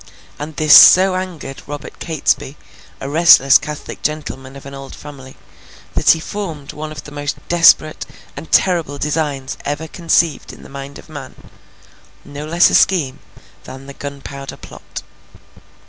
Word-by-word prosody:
And 150 Hz, +1 st, -7 dB
this 155 Hz, 0 st, +6 dB
so 190 Hz, +1 st, +8 dB
angered 185 Hz, -7 st, -6 dB
Robert 145 Hz, 0 st, -8 dB
Catesby, 150 Hz, -3 st, -1 dB, 0.4 s
a 135 Hz, -, -6 dB
restless 145 Hz, -3 st, +6 dB
Catholic 150 Hz, -1 st, -8 dB
gentleman 140 Hz, -3 st, -5 dB
of 140 Hz, -, -12 dB
an 140 Hz, -, -9 dB
old 135 Hz, 0 st, -9 dB
family, 135 Hz, -3 st, -12 dB, 0.6 s
that -, -, +1 dB
he 165 Hz, -, +6 dB
formed 165 Hz, -6 st, -6 dB
one 155 Hz, 0 st, -7 dB
of 155 Hz, -, -9 dB
the 150 Hz, -, -12 dB
most 145 Hz, 0 st, -4 dB
desperate 165 Hz, -2 st, +4 dB, 0.3 s
and 145 Hz, +3 st, -10 dB
terrible 165 Hz, -6 st, +2 dB
designs 145 Hz, -3 st, -3 dB
ever 145 Hz, +3 st, -4 dB
conceived 165 Hz, -2 st, 0 dB
in -, -, -14 dB
the -, -, -13 dB
mind 140 Hz, 0 st, -9 dB
of -, -, -15 dB
man; 145 Hz, -4 st, -10 dB, 0.9 s
no 145 Hz, +1 st, -8 dB
less 170 Hz, +3 st, +4 dB
a -, -, -3 dB
scheme 155 Hz, -9 st, +2 dB, 0.5 s
than 130 Hz, +1 st, -10 dB
the 140 Hz, -, -10 dB
Gunpowder 140 Hz, -1 st, -8 dB
Plot. -, -, -10 dB
145 Hz, 150 wpm, -17 LUFS, 140-160 Hz, 0.9 s, so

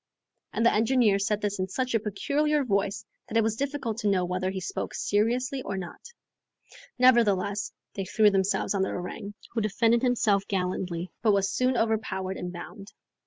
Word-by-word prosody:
And 230 Hz, -, 0 dB
the -, -, +5 dB
engineer 220 Hz, -2 st, +3 dB
said 210 Hz, +1 st, 0 dB
this 205 Hz, -1 st, -2 dB
in 185 Hz, -, 0 dB
such 255 Hz, +6 st, -2 dB
a 225 Hz, -, +3 dB
peculiar 285 Hz, +8 st, 0 dB
voice 200 Hz, -2 st, -1 dB, 0.2 s
that 225 Hz, -, -1 dB
it 225 Hz, -, +4 dB
was 220 Hz, 0 st, 0 dB
difficult 270 Hz, -4 st, -3 dB
to 210 Hz, -, -1 dB
know 185 Hz, -2 st, +2 dB
whether 185 Hz, +1 st, -1 dB
he 190 Hz, 0 st, -3 dB
spoke 180 Hz, -, -4 dB
seriously 245 Hz, +6 st, 0 dB
or 195 Hz, -5 st, -4 dB
not. 180 Hz, -2 st, -7 dB, 1.0 s
Nevertheless, 210 Hz, -5 st, +3 dB, 0.2 s
they 195 Hz, -, -4 dB
threw 210 Hz, +2 st, +4 dB
themselves 195 Hz, +1 st, +1 dB
on 195 Hz, -, 0 dB
the 190 Hz, -, +1 dB
orang, 200 Hz, +3 st, -6 dB, 0.2 s
who 230 Hz, -, -1 dB
defended 225 Hz, +3 st, +2 dB
himself 215 Hz, -6 st, +2 dB
gallantly, 180 Hz, -2 st, -2 dB
but 215 Hz, -3 st, +4 dB
was 195 Hz, 0 st, +1 dB
soon 255 Hz, 0 st, +1 dB
overpowered 200 Hz, -4 st, -1 dB
and 180 Hz, 0 st, -5 dB
bound. 195 Hz, +3 st, -9 dB
205 Hz, 175 wpm, -27 LUFS, 190-235 Hz, 1.0 s, the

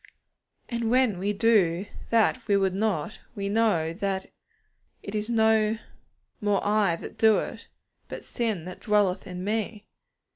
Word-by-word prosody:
And 235 Hz, -2 st, -2 dB
when 245 Hz, -6 st, +3 dB
we 200 Hz, +2 st, 0 dB
do 200 Hz, -5 st, +3 dB, 0.2 s
that 230 Hz, +2 st, +3 dB
we 200 Hz, -2 st, +4 dB
would 190 Hz, -1 st, +1 dB
not, 200 Hz, -3 st, -1 dB, 0.2 s
we 200 Hz, -1 st, -3 dB
know 200 Hz, -7 st, +2 dB
that 195 Hz, 0 st, -2 dB, 0.8 s
'it 200 Hz, -, -7 dB
is 215 Hz, +1 st, -2 dB
no 220 Hz, -1 st, +3 dB, 0.6 s
more 205 Hz, -2 st, +2 dB
I 205 Hz, -4 st, +3 dB
that -, -, -10 dB
do 220 Hz, -1 st, +6 dB
it, -, -, -5 dB, 0.4 s
but -, -, -7 dB
sin 220 Hz, -9 st, -2 dB
that 185 Hz, -, -8 dB
dwelleth 205 Hz, -3 st, +1 dB
in 180 Hz, -1 st, -6 dB
me.' 215 Hz, +1 st, -2 dB
210 Hz, 145 wpm, -26 LUFS, 190-220 Hz, 0.8 s, do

